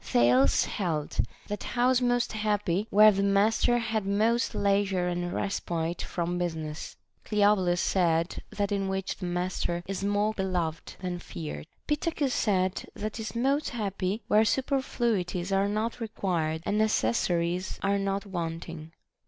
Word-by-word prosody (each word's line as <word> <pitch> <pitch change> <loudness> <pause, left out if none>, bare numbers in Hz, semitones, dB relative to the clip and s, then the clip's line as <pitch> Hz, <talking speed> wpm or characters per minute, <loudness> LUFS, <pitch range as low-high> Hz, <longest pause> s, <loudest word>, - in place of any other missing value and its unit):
Thales 125 +2 +4
held 160 -7 -3 0.3
that 205 - -4
house 250 +1 +2
most 245 -2 +1
happy 210 -2 0
where 215 +1 +7
the 195 -1 0
master 210 +4 +3
had 225 -2 -1
most 220 +4 +1
leisure 195 -2 +1
and 175 0 -2
respite 170 -4 -2
from 175 0 -2
business. 160 -3 -4 0.3
Cleobulus 205 -4 +3
said, 170 -2 +1
That 205 0 -2
in 195 -1 0
which 190 0 -2
the 180 - -4
master 175 -1 -2
is 195 0 -4
more 205 +2 +1
beloved 180 -5 -2
than 180 -1 -3
feared. 75 - -7 0.2
Pittacus 295 -3 0
said, 190 -3 0
That 215 +2 -4
is 220 +1 -5
most 275 +5 +1
happy 200 -2 -2
where 215 +1 +5
superfluities 225 -8 0
are 195 +1 +2
not 220 +3 -2
required 175 -8 -2
and 210 +1 +1
necessa 175 - +2
ries 175 +2 -2
are 200 0 +2
not 195 0 -1
wanting. 165 -3 -5
195 Hz, 140 wpm, -28 LUFS, 175-215 Hz, 0.3 s, where